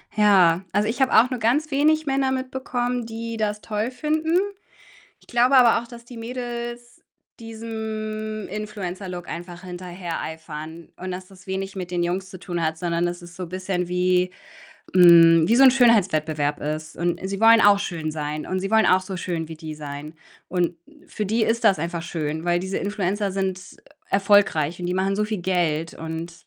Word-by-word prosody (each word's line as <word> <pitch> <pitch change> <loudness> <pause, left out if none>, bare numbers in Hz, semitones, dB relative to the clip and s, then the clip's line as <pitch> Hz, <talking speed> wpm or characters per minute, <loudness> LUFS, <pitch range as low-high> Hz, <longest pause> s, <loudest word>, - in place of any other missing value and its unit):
Ja. 190 -5 +5
Also, 205 +2 +2
ich 245 +4 -3
habe 265 - +3
auch 235 +3 +6
nur 255 -2 -3
ganz 280 +8 +1
wenig 310 +3 +3
Männer 270 -1 +1
mitbekommen, 255 -2 -2
die 230 0 -6
das 210 -1 -2
toll 215 +3 -2
finden. 310 +5 0 0.8
Ich - - -25
glaube 245 +3 +3
aber 235 -2 +6
auch, 235 - -13
dass 235 -1 -12
die 240 0 -12
Mädels 240 0 -6 0.4
diesem 220 -1 -5
Influencer-Look 190 -3 -6
einfach 175 +1 -7
hinterhereifern 170 -3 -7
und, 185 +1 -6
dass 185 +1 -6
das 185 -1 -18
wenig 190 0 -3
mit 180 -2 -6
den 175 -1 0
Jungs 185 +2 -3
zu 185 - -9
tun 175 -1 -4
hat, 160 0 -1
sondern, 170 0 0
dass 175 +1 -5
ist 175 0 -12
so 185 - -5
bisschen 185 0 -3
wie, 180 0 +1 0.7
hm 165 -2 +8
wie 230 - +4
so 265 - +6
'n 265 - +10
Schönheitswettbewerb 160 - +2
ist 155 +1 -4
und 175 0 -1
sie 195 +1 -3
wollen 225 +1 +7
auch 205 0 +6
schön 165 -6 -3
sein. 150 0 -4
Und 185 - -1
sie 195 +2 -4
wollen 220 0 +5
auch 185 +1 +4
so 185 0 -6
schön 170 -2 -3
wie 160 - -7
die 155 -1 -8
sein 150 +1 -8 0.3
und 175 -1 0 0.3
für 210 - -4
die 220 +2 +2
ist 230 +2 0
das 205 -4 +5
einfach 170 +2 -3
schön, 160 -2 -4
weil 175 0 +2
diese 190 +1 -3
Influencer 200 0 -1
sind, 190 -1 -2
äh, - - -13 0.4
erfolgreich 195 -6 +3
und 175 - -4
die 180 - -1
machen 190 +1 0
so 210 - +1
viel 215 0 -3
Geld 165 -3 0
und 165 +1 -6
190 Hz, 185 wpm, -23 LUFS, 175-225 Hz, 0.8 s, n